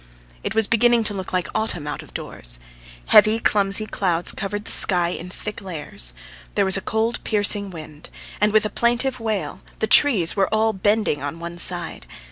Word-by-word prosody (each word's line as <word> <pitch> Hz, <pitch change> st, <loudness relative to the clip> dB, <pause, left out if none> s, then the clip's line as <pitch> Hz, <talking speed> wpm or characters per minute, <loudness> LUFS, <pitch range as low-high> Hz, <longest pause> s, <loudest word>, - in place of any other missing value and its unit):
It -, -, -4 dB
was 225 Hz, -1 st, +4 dB
beginning 235 Hz, +1 st, +2 dB
to 210 Hz, -, -2 dB
look 190 Hz, -2 st, -6 dB
like 180 Hz, -4 st, -2 dB
autumn 215 Hz, -8 st, -2 dB
out 150 Hz, -, -5 dB
of -, -, -16 dB
doors. -, -, -5 dB, 0.5 s
Heavy, 215 Hz, +1 st, +6 dB
clumsy 200 Hz, -1 st, +3 dB
clouds 175 Hz, -5 st, -1 dB
covered 205 Hz, +1 st, -5 dB
the -, -, -3 dB
sky 175 Hz, -3 st, +5 dB
in 175 Hz, 0 st, -6 dB
thick 210 Hz, +3 st, -7 dB
layers; 150 Hz, -, -7 dB, 0.4 s
there -, -, +1 dB
was 190 Hz, -, +2 dB
a 195 Hz, -, -2 dB
cold, 220 Hz, +4 st, -2 dB
piercing 205 Hz, -1 st, +1 dB
wind, 155 Hz, -3 st, -11 dB, 0.3 s
and 210 Hz, 0 st, +3 dB
with 215 Hz, 0 st, +3 dB
a 215 Hz, -, -3 dB
plaintive 240 Hz, +2 st, 0 dB
wail 220 Hz, -4 st, -4 dB, 0.2 s
the -, -, -1 dB
trees 215 Hz, -, +4 dB
were 195 Hz, -2 st, 0 dB
all 220 Hz, 0 st, +1 dB
bending 205 Hz, -5 st, 0 dB
on 145 Hz, +4 st, -6 dB
one 170 Hz, +1 st, -7 dB
side. 175 Hz, -1 st, +3 dB
200 Hz, 185 wpm, -21 LUFS, 175-220 Hz, 0.5 s, Heavy